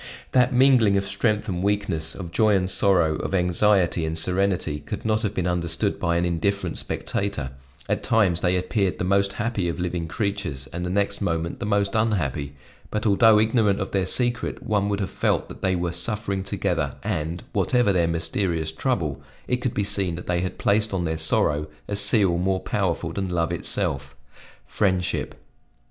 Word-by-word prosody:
That 125 0 +3
mingling 125 -6 +4
of 100 - 0
strength 105 +2 0
and 90 -3 -2
weakness, 100 -6 -1
of 85 -4 -7
joy 105 +2 +3
and 90 -1 +1
sorrow, 85 -5 +2
of - - -3
anxiety 90 -1 +2
and 80 0 -2
serenity 90 -3 +1
could 75 +8 -7
not 110 0 +1
have 105 -3 -2
been 90 - -1
understood 90 +3 0
by 85 -2 0
an 85 +1 +1
indifferent 90 +1 -1
spectator; 100 -10 -3 0.4
at - - -1
times 95 -6 +2
they 90 0 +2
appeared 95 +1 -1
the - - -3
most 100 +1 +2
happy 105 -5 -2
of 85 - -4
living 90 -2 -2
creatures, 100 - -3
and 85 +1 -4
the 90 - -2
next 100 +2 -1
moment 85 -3 -2
the - - -3
most 100 -1 +1
unhappy; 80 - -1 0.3
but 105 0 -3
although 110 +1 +5
ignorant 110 -2 +2
of 95 - -4
their 95 -2 0
secret, 120 +3 +1
one 105 -1 0
would 100 0 -1
have 95 - -3
felt - - 0
that - - -11
they 95 -1 +1
were 90 -1 -1
suffering 100 +2 -2
together, 95 - -2
and, 80 +3 -3
whatever 105 +1 +2
their 85 -2 +2
mysterious 85 -1 0
trouble, 80 - -2 0.3
it 125 - +1
could 125 -1 -3
be 100 - +1
seen 100 -4 0
that 90 - -8
they 85 -1 0
had 90 - -4
placed 105 0 +1
on 90 -2 -1
their 80 0 -1
sorrow 75 -1 +1 0.2
a 100 - -2
seal 100 -4 +4
more 95 +1 0
powerful 85 -4 -2
than 95 0 -3
love 85 -2 -1
itself 65 0 -1 0.5
friendship. 95 -4 -1
95 Hz, 185 wpm, -24 LUFS, 85-105 Hz, 0.5 s, although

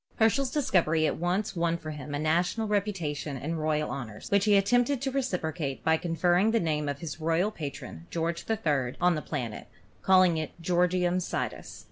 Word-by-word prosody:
Herschel's 240 +4 +2
discovery 185 - +2
at - - 0
once 180 +5 -1
won 170 0 +1
for 155 -2 -7
him 145 -1 -6
a - - 0
national 175 +8 +1
reputation 175 -9 -2
and 160 +5 -3
royal 155 -1 0
honors, 110 -6 -7
which 200 0 +3
he 205 -2 +5
attempted 245 +7 +2
to 270 +1 -2
re 275 +1 +1
ciprocate 160 - -3
by 160 0 +3
conferring 175 +4 +2
the 230 +1 +2
name 150 -5 -1
of 140 0 -4
his 160 -1 -6
royal 165 +6 +1
patron, 140 - -7
George 170 0 -2
III., 145 - 0
on 180 0 +4
the 155 - -2
new - - -19
planet, 115 -4 -4 0.3
calling 185 -3 +5
it 155 +1 -5
Georgium 180 +1 +1
Sidus. 180 - -4
170 Hz, 185 wpm, -28 LUFS, 155-195 Hz, 0.3 s, he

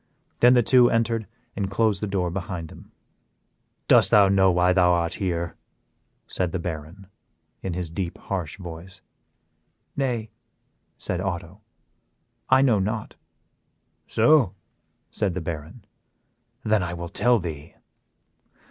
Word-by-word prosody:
Then 125 +1 +6
the 120 - +4
two 125 +1 +5
entered 115 -1 0 0.3
and 100 -2 -2
closed 105 0 +1
the 105 - -2
door 95 -3 -1
behind 90 -3 -5
them. - - -15 1.0
"Dost - - +6
thou 100 -2 +6
know 95 -1 +4
why 90 +1 +3
thou 90 -1 +4
art 85 -1 0
here?" 85 -3 -2 0.7
said 90 -2 -2
the 95 - -2
Baron, 85 +2 -7 0.6
in 95 - -4
his 90 -3 -4
deep, 85 0 -4
harsh 90 -6 -5
voice. 90 +1 -10 0.9
"Nay," 120 -6 -2 0.7
said 90 -1 -3
Otto, 95 +1 -5 0.9
"I 130 +1 +5
know 120 -7 +3
not." 105 +3 -3 0.9
"So?" 140 -12 +3 0.6
said 100 -5 -1
the - - -1
Baron. 80 +5 -7 0.8
"Then 110 -2 +2
I 85 -1 -3
will 85 0 -6
tell 120 +6 +3
thee. 80 -5 -7
95 Hz, 130 wpm, -24 LUFS, 85-110 Hz, 1.0 s, Then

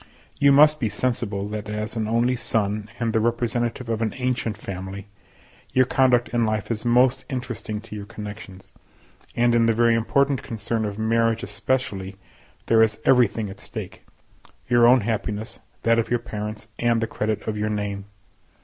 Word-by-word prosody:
You 140 0 +6
must 150 +2 +6
be 115 -5 0
sensible 105 -5 -2
that 105 0 -5
as 105 +2 -4
an 110 -2 -1
only 120 +3 +2
son, 105 -3 -1
and 115 -2 -1
the 110 - +3
representative 120 +1 -1
of 115 -1 -2
an 110 -2 -1
ancient 125 -4 -1
family, 95 -1 -7 0.7
your 130 0 +5
conduct 125 -2 +3
in 120 -1 +1
life 110 0 -1
is 110 -2 -3
most 125 +2 +3
interesting 125 -5 -4
to 110 -1 -10
your 100 -1 -7
connections; 105 -3 -9 0.6
and 120 0 +3
in 115 -1 +4
the 115 - +2
very 115 0 +4
important 140 +4 +1
concern 110 0 -3
of 100 -1 -4
marriage 115 +1 +1
especially, 100 -2 -2 0.5
there 115 -1 +4
is 110 -1 +2
everything 115 -4 +3
at 100 - -12
stake—your 120 +2 -2
own 125 0 +6
happiness, 105 +1 -3 0.2
that 115 0 +4
of 115 - -1
your 120 - +2
parents, 105 -2 -6
and 120 -1 +2
the 115 - 0
credit 110 -2 -3
of 110 - -1
your 105 0 -1
name. 100 -2 -3
115 Hz, 165 wpm, -24 LUFS, 105-120 Hz, 0.7 s, You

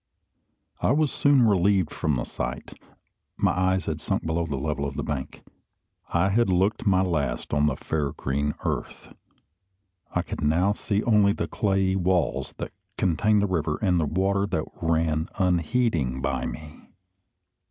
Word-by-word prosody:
I - - +3
was 150 -1 +2
soon 140 -3 +4
relieved 95 -4 +3
from 75 -2 -1
the - - -1
sight. 60 0 -5 0.6
My - - +2
eyes 95 +1 +1
had 80 0 -3
sunk - - -2
below 80 +1 -1
the 75 - -3
level 70 +1 -2
of 70 - -7
the - - -3
bank. 65 -3 -5 0.7
I 90 +3 +2
had 115 +2 +2
looked 95 +5 +1
my 95 -1 +4
last 70 -9 -2
on 75 +1 +3
the 70 - 0
fair 75 -3 -2
green 70 +2 -2
earth. - - -4 1.0
I - - 0
could - - -6
now 85 +7 +2
see 105 0 -1
only 105 -3 +4
the - - -3
clayey 95 -2 +1
walls 90 -1 0
that - - -5 0.3
contained 100 +4 +2
the - - +2
river, 80 -5 -1
and 90 -5 +2
the 80 - +1
water 100 +5 +1
that 80 -6 -1 0.2
ran 80 -1 +1
unheeding 85 - +1
by 70 0 -1
me. 75 -1 -9
90 Hz, 160 wpm, -25 LUFS, 75-100 Hz, 1.0 s, soon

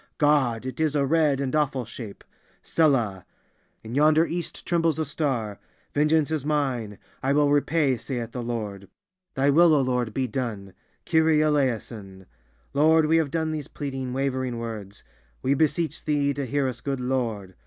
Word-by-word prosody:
God! 135 -6 +2
It 130 +1 -6
is 155 -2 +1
a 140 -1 +2
red 150 -2 +2
and 135 0 -1
awful 135 -5 0
shape. 110 -2 -9 0.4
Selah! 120 - +1 0.6
In 110 +1 -8
yonder 155 +3 +4
East 170 0 -5
trembles 165 -3 +1
a 160 - -1
star. 130 -8 -2 0.3
Vengeance 150 +1 +2
is 155 -4 -1
mine; 130 -9 -1 0.2
I 135 +1 +1
will 145 0 +3
repay, 145 -2 +2
saith 120 -2 -5
the 125 - -5
Lord! 105 -5 -5 0.5
Thy 140 +2 +3
will, 165 +1 +6
O 145 - +3
Lord, 125 -3 0
be 130 +4 -1
done! 110 -6 -4 0.3
Kyrie 160 -1 +3
Eleison! 115 -10 -1 0.5
Lord, 155 +2 +4
we 160 +2 +3
have 160 -3 +1
done 160 +1 -1
these 150 -3 -4
pleading, 135 -3 -5
wavering 130 -2 -2
words. 110 -4 -7 0.4
We 135 - +3
beseech 155 +2 0
Thee 145 -2 +1
to 140 -1 -4
hear 140 +1 0
us, 125 -2 -5
good 135 -2 -2
Lord! 120 -7 -2
135 Hz, 165 wpm, -25 LUFS, 120-150 Hz, 0.6 s, will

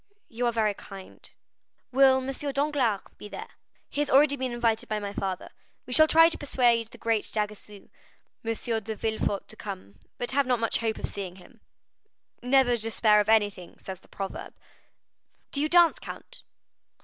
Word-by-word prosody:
"You 240 +1 -1
are - - +2
very 220 -2 +1
kind." 195 -1 -10 0.6
"Will 265 0 +4
M. 280 +1 -3
Danglars 275 -7 +1 0.2
be - - -8
there?" 445 - -8 0.4
"He 290 - -3
has 295 - -1
already 285 +1 +5
been 260 -2 -3
invited 230 -2 0
by 215 - 0
my 200 -1 -5
father. 190 -2 -4 0.3
We 250 - -6
shall 310 +4 +7
try 325 +1 +7
to 335 - -2
persuade 240 -5 +2
the - - -15
great 225 -2 0
d'Aguesseau,11 210 +2 -6
M. 220 - -5
de 220 +1 -4
Villefort, 215 -2 -2
to - - -10
come, 185 - -8 0.2
but 245 - -2
have 275 0 +2
not 250 -2 +2
much 230 -1 0
hope 225 -1 -1
of - - -3
seeing 190 -3 -6
him." 180 -2 -17 0.8
"'Never 250 -1 +3
despair 220 -1 +3
of 210 +1 0
anything,' 205 -5 +1
says 190 -2 -8
the - - -22
proverb." 195 -1 -7 1.0
"Do 280 - 0
you 305 - 0
dance, 345 -1 +5
count?" - - -9
230 Hz, 175 wpm, -27 LUFS, 210-265 Hz, 1.0 s, shall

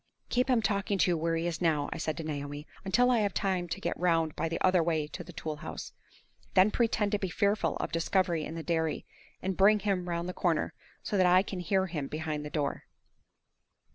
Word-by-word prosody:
"Keep 250 +2 +1
him 240 -3 +3
talking 200 0 0
to 180 - +3
you - - +2
where 165 +1 0
he 165 +1 -1
is 170 0 -2
now," 155 -4 +2
I - - -6
said 155 -1 -2
to 165 - -4
Naomi, 145 -1 -5 0.2
"until 245 +6 +3
I 240 - +3
have 205 -3 0
time 185 -3 0
to - - -4
get 170 - -3
round 165 -3 +2
by 165 - -1
the 165 - -2
other 185 -1 +4
way 160 -2 +1
to 150 - -7
the 175 - -11
tool 155 -2 -5
house. - - -7 0.6
Then 190 +3 +6
pretend 220 -3 +1
to 205 - +1
be 190 - -2
fearful 200 +4 +1
of - - -3
discovery 170 -1 +1
at 160 - -7
the 165 - -5
dairy, 160 -2 -1 0.4
and 190 0 -1
bring 205 +3 +6
him 190 -3 -1
round 170 0 -2
the 180 - -4
corner, 170 -4 0 0.3
so 205 - -1
that 185 -1 +5
I 180 +1 +6
can 190 -2 -5
hear 190 +2 +1
him 155 -6 -4
behind 155 0 -3
the 150 - -5
door." 150 -2 -2
175 Hz, 230 wpm, -30 LUFS, 160-195 Hz, 0.6 s, Then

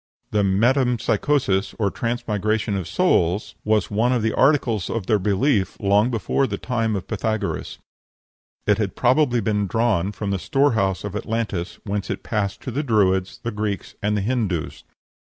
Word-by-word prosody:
The 105 - +2
metempsychosis 115 +1 +1
or 100 -3 0
transmigration 110 -3 -1
of 95 -4 -3
souls 90 +5 +1
was 110 0 +1
one 115 +4 +2
of 125 -3 +1
the 110 - +1
articles 125 - +2
of 115 -5 -2
their 105 +2 +2
belief 100 +2 +1
long 105 +3 +3
before 125 +3 0
the 100 -3 -3
time 115 -3 -1
of 95 - -4
Pythagoras; 110 -3 -2 0.9
it 105 0 +3
had 100 -4 -1
probably 125 -1 +3
been 105 -1 0
drawn 105 -3 +1
from 105 -1 -4
the 100 - -1
storehouse 110 -8 +1
of 105 -1 -5
Atlantis, 105 -5 -3
whence 100 -1 -3
it - - -4
passed 100 -3 -2
to 130 - -5
the 140 - -1
Druids, 95 -8 +1
the 120 - -2
Greeks, 105 -2 -3
and 105 +1 0
the - - 0
Hindoos. 105 -7 -2
105 Hz, 160 wpm, -22 LUFS, 100-120 Hz, 0.9 s, long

